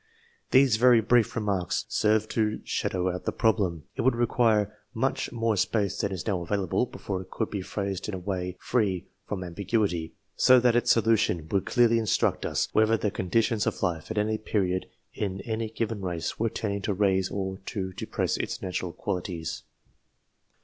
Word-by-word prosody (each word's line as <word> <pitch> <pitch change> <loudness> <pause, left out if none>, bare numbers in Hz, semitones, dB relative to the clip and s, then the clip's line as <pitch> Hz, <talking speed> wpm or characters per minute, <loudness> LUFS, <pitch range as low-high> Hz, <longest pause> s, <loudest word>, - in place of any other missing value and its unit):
These 130 -4 +5
very 120 0 +6
brief 115 0 +3
remarks 100 -6 -1
serve 110 0 +2
to 110 -1 0
shadow 90 -1 -1
out 90 - -6
the - - 0
prob 110 0 +2
lem; 85 -6 -1
it - - -1
would 130 -1 +3
require 110 -3 +2 0.2
much - - -1
more 115 -2 0
space 100 0 0
than 100 -3 -1
is 90 -2 -4
now 95 -5 0
available, 100 +6 0
before 95 -5 -5
it 95 - -12
could 110 - -3
be 100 - -2
phrased 100 0 -3
in 105 - -3
a - - -4
way 90 -1 -3
free 95 -6 0 0.2
from 95 -3 -3
ambiguity, 90 -2 -1 0.2
so 130 0 +6
that 120 -1 +3
its 120 0 +2
solution 110 -8 +3
would 100 -2 0
clearly 120 -2 +4
instruct 110 -3 +1
us - - 0
whether 110 +1 +4
the 105 -2 -1
conditions 105 +4 +1
of - - -2
life 85 -3 -1
at 110 - -4
any 110 +1 +1
period 95 -4 -1 0.3
in 95 -2 -3
any 110 +1 -3
given 110 -1 -3
race 90 -3 -3
were 115 +1 +1
tending 100 -2 -3
to 100 0 -1
raise 95 -1 +2
or 95 -1 -3
to 95 -2 -3
depress - - -2
its - - -3
natural 90 -2 -3
qualities. 90 -4 -4
105 Hz, 180 wpm, -27 LUFS, 95-110 Hz, 0.3 s, very